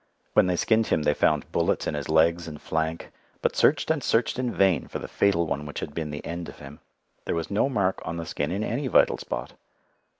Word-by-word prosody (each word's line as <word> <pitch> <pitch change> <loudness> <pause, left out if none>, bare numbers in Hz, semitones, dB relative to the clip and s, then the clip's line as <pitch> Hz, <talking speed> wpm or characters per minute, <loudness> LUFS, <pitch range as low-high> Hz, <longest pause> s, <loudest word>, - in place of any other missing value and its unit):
When - - +5
they 90 - +1
skinned 110 +4 +2
him 75 - +1
they 75 - +3
found 75 0 +1
bullets - - +1
in - - -1
his 75 0 -4
legs 85 +2 +3
and 75 -2 -8
flank, 80 +2 -3 0.3
but - - +1
searched 150 +2 +3
and 155 -5 -1
searched 115 +2 +1
in 125 -2 0
vain 95 -7 +2
for - - -5
the - - -7
fatal 95 -4 +2
one 75 -1 -3
which 75 - -5
had 75 - -6
been 80 -1 -3
the 75 0 -6
end 85 0 -5
of - - -12
him. 70 +2 -11 0.5
There - - -1
was 85 +3 -3
no 105 +7 +2
mark 100 -7 0
on 85 - -4
the 85 - -4
skin 75 -1 -2
in 100 +4 -1
any 130 +5 -2
vital - - +4
spot. - - -5
85 Hz, 235 wpm, -26 LUFS, 75-100 Hz, 0.5 s, When